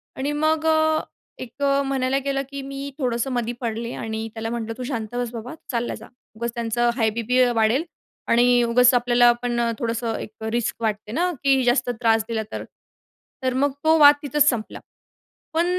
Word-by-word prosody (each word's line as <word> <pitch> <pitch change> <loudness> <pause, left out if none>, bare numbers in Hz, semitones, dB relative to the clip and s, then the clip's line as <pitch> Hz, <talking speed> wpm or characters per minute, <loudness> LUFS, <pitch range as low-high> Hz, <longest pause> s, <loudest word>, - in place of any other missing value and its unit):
आणि 280 +2 -2
मग 310 +1 +1
अ, 315 0 +3 0.4
एक 250 +4 -14
अ, 280 0 +3
म्हणायला 270 -1 0
गेलं 275 -1 0
की 280 0 -6
मी 275 +1 -6
थोडंसं 250 -2 -1
मधी 240 -1 -1
पडले 230 0 -3
आणि 220 0 -4
त्याला 225 0 -4
म्हटलं, 230 -1 -4
"तू 255 - -5
शांत 240 -3 -4
बस 245 -1 -2
बाबा, 235 +3 -7 0.2
चालला 240 -1 -2
जा. - - -12 0.3
उगाच 235 +2 -3
त्यांचं 235 +1 0
हाय 225 -3 +2
बीपी 235 +3 +1
वाढेल 225 +6 +2 0.4
आणि 245 +1 +4
उगाच 245 +2 +5
आपल्याला 240 0 +5
पण" 240 -1 -1 0.2
थोडंसं 230 -1 -2
एक - - -7
रिस्क 230 +1 -1
वाटते 215 -1 -2
ना 355 +7 0
की 270 -1 +3
जास्त 245 +1 +2
त्रास 225 -1 +3
दिला 225 -2 -2
तर. - - -5 0.8
तर 255 - +1
मग 280 +3 +1
तो 320 +1 +5
वाद 290 0 +9
तिथंच 295 +1 +3
संपला, 230 -4 -3 0.7
पण 330 +2 +2
245 Hz, 180 wpm, -23 LUFS, 230-275 Hz, 0.8 s, वाद